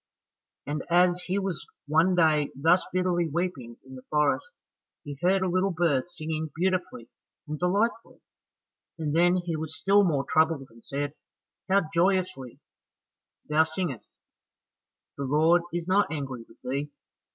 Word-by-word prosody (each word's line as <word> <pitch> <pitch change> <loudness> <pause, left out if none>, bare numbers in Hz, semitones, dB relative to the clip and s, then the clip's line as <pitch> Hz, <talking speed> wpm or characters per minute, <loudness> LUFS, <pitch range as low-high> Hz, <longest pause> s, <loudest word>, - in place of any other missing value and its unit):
And 145 -1 -3
as 175 +1 +4
he 185 +2 0
was 190 -4 -3 0.2
one 160 +5 +3
day 155 -4 +3
thus 165 +7 +3
bitterly 180 -2 +1
weeping 145 -8 -3
in 130 - -12
the 130 - -9
forest, 150 - +1 0.5
he 145 -2 -7
heard 190 +2 +3
a - - +1
little 185 +2 +1
bird 165 -5 0
singing 155 -2 -4
beautifully 180 -8 -1 0.4
and 150 0 -5
delightfully, 205 +6 0 0.8
and 155 -2 -2
then 175 +2 +4
he 175 -2 -2
was 160 0 -5
still 200 +3 +4
more 150 -7 +1
troubled 160 -4 +1
and 115 0 -18
said, 145 +1 -3 0.6
"How 195 +1 +4
joyously 175 -8 0 0.9
thou 150 +1 +4
singest, 160 - -4 1.1
the 140 - -2
Lord 160 +5 +4
is 170 0 -3
not 195 0 +3
angry 135 -6 -5
with - - -19
thee. 140 +3 -3
165 Hz, 140 wpm, -27 LUFS, 145-180 Hz, 1.1 s, as